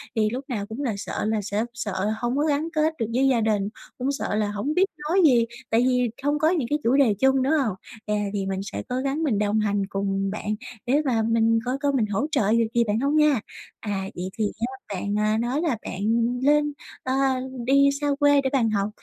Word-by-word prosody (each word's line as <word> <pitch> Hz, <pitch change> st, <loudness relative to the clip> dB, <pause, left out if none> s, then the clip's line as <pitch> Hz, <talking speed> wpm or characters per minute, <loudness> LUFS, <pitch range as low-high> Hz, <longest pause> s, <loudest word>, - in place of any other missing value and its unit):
thì 220 Hz, -, +2 dB
lúc 245 Hz, -, -3 dB
lúc 270 Hz, +1 st, -9 dB
nào 205 Hz, -5 st, -2 dB
cũng 225 Hz, +6 st, -6 dB
là 235 Hz, -6 st, 0 dB
sợ 200 Hz, -, -4 dB
là 215 Hz, -1 st, 0 dB
sẽ 205 Hz, +2 st, -1 dB
sợ 220 Hz, -5 st, -4 dB
là 215 Hz, -, +1 dB
hông 240 Hz, +3 st, 0 dB
có 295 Hz, -, +2 dB
gắn 305 Hz, +2 st, 0 dB
kết 310 Hz, +1 st, +2 dB
được 225 Hz, -, +1 dB
với 270 Hz, +2 st, +3 dB
gia 245 Hz, -4 st, +3 dB
đình, 210 Hz, -2 st, +1 dB, 0.3 s
cũng 265 Hz, +2 st, -1 dB
sợ 275 Hz, -6 st, -2 dB
là 210 Hz, -1 st, 0 dB
hổng 235 Hz, +9 st, -2 dB
biết 375 Hz, +3 st, +4 dB, 0.2 s
nói 375 Hz, +2 st, +4 dB
gì, 240 Hz, -5 st, +5 dB, 0.2 s
tại 225 Hz, +1 st, +3 dB
vì 250 Hz, -2 st, +2 dB
không 290 Hz, +1 st, +1 dB
có 315 Hz, +2 st, +3 dB
những 310 Hz, -10 st, 0 dB
cái 295 Hz, +1 st, +1 dB
chủ 240 Hz, +4 st, +3 dB
đề 260 Hz, -7 st, +4 dB
chung, 265 Hz, 0 st, +3 dB
đúng 285 Hz, +4 st, +2 dB
hông? 260 Hz, -11 st, +1 dB, 0.3 s
À, 210 Hz, 0 st, 0 dB, 0.2 s
thì 195 Hz, -2 st, -1 dB
mình 190 Hz, 0 st, -2 dB
sẽ -, -, -4 dB
cố 250 Hz, -, -2 dB
gắng 275 Hz, +4 st, -1 dB
mình 230 Hz, -9 st, +1 dB
đồng 210 Hz, +1 st, +1 dB
hành 205 Hz, -1 st, +1 dB
cùng 195 Hz, 0 st, -1 dB
bạn 215 Hz, 0 st, -3 dB, 0.3 s
để 280 Hz, +5 st, +3 dB
mà 230 Hz, -4 st, +2 dB
mình 225 Hz, 0 st, +3 dB
coi 255 Hz, +2 st, -1 dB
coi 285 Hz, -1 st, 0 dB
mình 235 Hz, -5 st, +2 dB
hỗ 210 Hz, +8 st, -1 dB
trợ 210 Hz, -8 st, +2 dB
được 230 Hz, 0 st, +3 dB
gì 235 Hz, -, +4 dB
bạn 215 Hz, 0 st, 0 dB
hông 280 Hz, +3 st, +1 dB
nha. 300 Hz, -5 st, +4 dB, 0.4 s
À, 205 Hz, -3 st, -3 dB
vậy 180 Hz, +1 st, -4 dB
thì 215 Hz, -, +1 dB
á, 245 Hz, -4 st, -5 dB
bạn, 205 Hz, +3 st, -2 dB
à, 215 Hz, +1 st, +2 dB
nói 245 Hz, +6 st, -1 dB
là 310 Hz, -10 st, 0 dB
bạn 185 Hz, -, -6 dB, 0.4 s
lên 295 Hz, 0 st, +3 dB, 0.3 s
ờ, 260 Hz, -, -1 dB, 0.5 s
đi 275 Hz, +1 st, +5 dB
xa 290 Hz, -, 0 dB
quê 285 Hz, -1 st, +5 dB
để 265 Hz, -, 0 dB
bạn 235 Hz, -5 st, +3 dB
học 205 Hz, -1 st, 0 dB
240 Hz, 245 wpm, -24 LUFS, 210-280 Hz, 0.5 s, gì